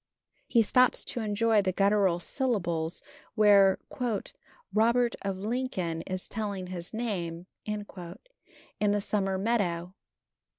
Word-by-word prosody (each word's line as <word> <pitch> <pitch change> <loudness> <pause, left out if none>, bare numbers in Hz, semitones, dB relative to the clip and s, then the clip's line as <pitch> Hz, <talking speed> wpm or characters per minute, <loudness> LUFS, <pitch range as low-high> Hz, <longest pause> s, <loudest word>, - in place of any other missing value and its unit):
He 230 -2 +4
stops 255 +4 +3
to 250 - -4
enjoy 220 0 +2
the 190 -1 0
guttural 195 -2 +3
syllables 175 - -1 0.3
where 200 -2 +6 1.0
"Robert 235 +3 +3
of 195 -1 -2
Lincoln 195 -6 -2
is 185 0 -4
telling 200 -4 -4
his 175 -1 -5
name" 180 -7 -3 0.2
in 210 -1 -3 0.9
the 205 0 +2
summer 195 -2 0
meadow. 185 -5 0
200 Hz, 110 wpm, -29 LUFS, 185-220 Hz, 1.0 s, where